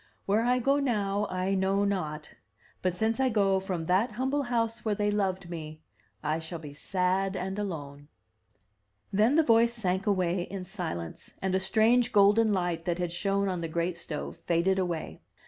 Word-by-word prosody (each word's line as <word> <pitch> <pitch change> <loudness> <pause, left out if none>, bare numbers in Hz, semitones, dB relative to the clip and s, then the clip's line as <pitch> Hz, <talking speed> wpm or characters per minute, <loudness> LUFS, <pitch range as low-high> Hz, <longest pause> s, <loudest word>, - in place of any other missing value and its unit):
Where 205 +3 +2
I 250 +1 +3
go 275 +3 +2
now 210 -6 0
I 185 +1 -1
know 195 +1 +2
not; 155 -7 -3 0.5
but 180 -1 -1
since 220 +4 0
I 265 -1 +3
go 200 -4 +2
from 185 -4 -3
that 200 +7 +2
humble 265 +5 0
house 230 -3 -1
where 215 -2 0
they 205 0 +1
loved 190 -3 -1
me, 155 -2 -7 0.4
I 155 +2 0
shall 165 +1 -6
be 150 -3 -9
sad 190 +4 0
and 190 +2 -3
alone.'* 145 -7 -5 1.1
Then 215 +8 +4
the 325 - +5
voice 235 -2 +4
sank 190 -2 -1
away 185 -3 +1
in 190 +1 -5
silence, 175 - -6
and 190 -1 -1
a 190 - +3
strange 225 +5 +3
golden 210 +2 +5
light 175 -4 -1
that 175 -1 0
had 175 -1 -2
shone 195 +3 0
on 180 -2 -2
the 165 - -2
great 170 +2 -1
stove 160 -3 -5
faded 180 +3 +1
away. 165 - -3
190 Hz, 180 wpm, -29 LUFS, 175-215 Hz, 1.1 s, the